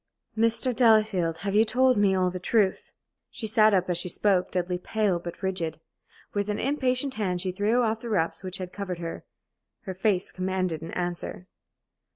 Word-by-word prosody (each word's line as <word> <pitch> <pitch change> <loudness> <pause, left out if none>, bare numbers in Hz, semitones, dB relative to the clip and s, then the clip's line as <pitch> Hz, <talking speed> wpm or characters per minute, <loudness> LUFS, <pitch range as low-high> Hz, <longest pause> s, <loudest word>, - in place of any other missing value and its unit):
"Mr. 230 +2 +1
Delafield, 215 -8 +3
have 200 - -1
you 215 +2 +6
told 250 +3 +3
me 200 -2 +3
all 185 -1 +1
the 185 - -5
truth?" 195 0 +1 0.4
She 225 - -6
sat 215 0 +4
up 185 -2 +2
as 175 -1 -1
she 180 - -3
spoke, 190 0 +1
deadly 180 0 -2
pale 205 -2 0
but 170 +2 -8
rigid. 170 -5 -2 0.5
With 205 0 -1
an 210 - -1
impatient 265 -1 0
hand 190 -6 -1
she 185 0 -1
threw 210 +6 +1
off 220 -1 0
the 235 - -7
wraps 170 -6 0
which 185 -1 -5
had 185 -1 -7
covered 190 -3 -4
her. 165 -1 -6 0.6
Her 190 - -6
face 190 0 0
commanded 185 -3 -2
an 165 - -7
answer. 175 0 -4
190 Hz, 185 wpm, -27 LUFS, 180-220 Hz, 0.6 s, you